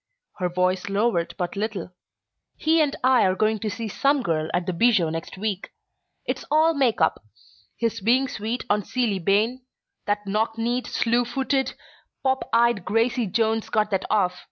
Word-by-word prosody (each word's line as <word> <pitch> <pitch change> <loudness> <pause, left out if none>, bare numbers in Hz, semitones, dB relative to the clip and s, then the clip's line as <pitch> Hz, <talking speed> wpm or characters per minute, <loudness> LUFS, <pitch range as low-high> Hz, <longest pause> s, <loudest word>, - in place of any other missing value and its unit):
Her 180 -1 0
voice 185 +2 0
lowered 195 -5 0
but 180 -1 -3
little. 200 -3 -3 0.7
"He 320 +1 +3
and 290 -2 +1
I 255 -1 +5
are 185 0 +2
going 215 +2 +1
to 215 - -2
see 225 +1 -4
'Some 275 +5 +1
Girl' 160 -3 -1
at 175 0 -1
the 185 - -2
Bijou 195 -4 +3
next 165 +3 -6
week. 200 -1 -3 0.5
It's - - -3
all 315 +2 +4
make 265 -6 +1
up - - +2 0.6
his 225 -2 -1
being 250 +6 +3
sweet 230 +2 -4
on 210 -2 +2
Ceeley 210 -5 -1
Bayne! 220 +7 +2 0.5
That 205 0 0
knock 220 +3 -1
kneed, 240 +2 -1
slew 235 +1 +1
footed, 265 +1 -1 0.5
pop 265 0 0
eyed 235 -4 +3
Gracie 230 +3 +1
Jones 220 +2 0
got 215 0 +1
that 195 -1 0
off. 180 -4 +1
220 Hz, 170 wpm, -24 LUFS, 195-245 Hz, 0.7 s, I